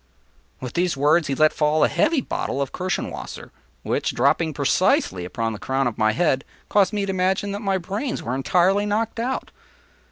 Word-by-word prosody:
” 65 Hz, +1 st, -37 dB
With 125 Hz, -2 st, -6 dB
these 175 Hz, -4 st, 0 dB
words 150 Hz, +3 st, +3 dB
he 135 Hz, -, -1 dB
let 155 Hz, +2 st, +4 dB
fall 150 Hz, 0 st, +2 dB
a -, -, +6 dB
heavy 310 Hz, -2 st, +2 dB
bottle 140 Hz, -, -3 dB
of 140 Hz, -2 st, -2 dB
Kirschenwasser 185 Hz, -1 st, -4 dB, 0.3 s
which, -, -, -1 dB
dropping -, -, +2 dB
precisely 90 Hz, -1 st, +1 dB
upon 115 Hz, +5 st, -3 dB
the 105 Hz, -, -7 dB
crown 135 Hz, +3 st, -1 dB
of 120 Hz, -3 st, -2 dB
my 110 Hz, 0 st, +3 dB
head, 135 Hz, -1 st, +1 dB, 0.3 s
caused 205 Hz, -1 st, +3 dB
me 205 Hz, -2 st, -1 dB
to 195 Hz, -, -2 dB
imagine 190 Hz, +2 st, 0 dB
that 200 Hz, -, -4 dB
my 195 Hz, -3 st, +1 dB
brains 200 Hz, +9 st, -4 dB
were 120 Hz, -, -3 dB
entirely 185 Hz, +9 st, +2 dB
knocked 220 Hz, +2 st, -1 dB
out. 255 Hz, +3 st, -3 dB
175 Hz, 190 wpm, -23 LUFS, 130-200 Hz, 0.3 s, a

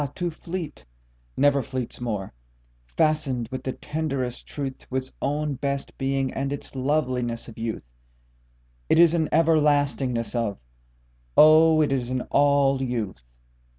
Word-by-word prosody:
to 175 Hz, -1 st, -2 dB
fleet, 165 Hz, -, -6 dB, 0.5 s
Never 140 Hz, -1 st, +4 dB
fleets 130 Hz, -2 st, -5 dB
móre, 105 Hz, -6 st, -3 dB, 0.6 s
fastened 130 Hz, -, 0 dB
with 130 Hz, -, -4 dB
the 130 Hz, -, -2 dB
tenderest 140 Hz, -5 st, -4 dB
truthTo 135 Hz, -2 st, -5 dB
its 130 Hz, 0 st, -5 dB
own 150 Hz, +1 st, -1 dB
best 140 Hz, +1 st, -3 dB
being 135 Hz, -1 st, 0 dB
and 135 Hz, +1 st, -2 dB
its 145 Hz, -1 st, -7 dB
loveliness 130 Hz, -4 st, -1 dB
of 115 Hz, -, -10 dB
youth: 115 Hz, -1 st, -4 dB, 1.1 s
it -, -, +4 dB
is 170 Hz, -1 st, +6 dB
an 160 Hz, -3 st, +1 dB
everlastingness 145 Hz, -6 st, +2 dB
of, 115 Hz, -5 st, -1 dB, 0.8 s
O 155 Hz, 0 st, +7 dB
it 145 Hz, -, 0 dB
is 125 Hz, -3 st, -1 dB
an 130 Hz, 0 st, -1 dB
all 140 Hz, -1 st, +3 dB
youth! 115 Hz, -, -3 dB
135 Hz, 130 wpm, -25 LUFS, 125-150 Hz, 1.1 s, O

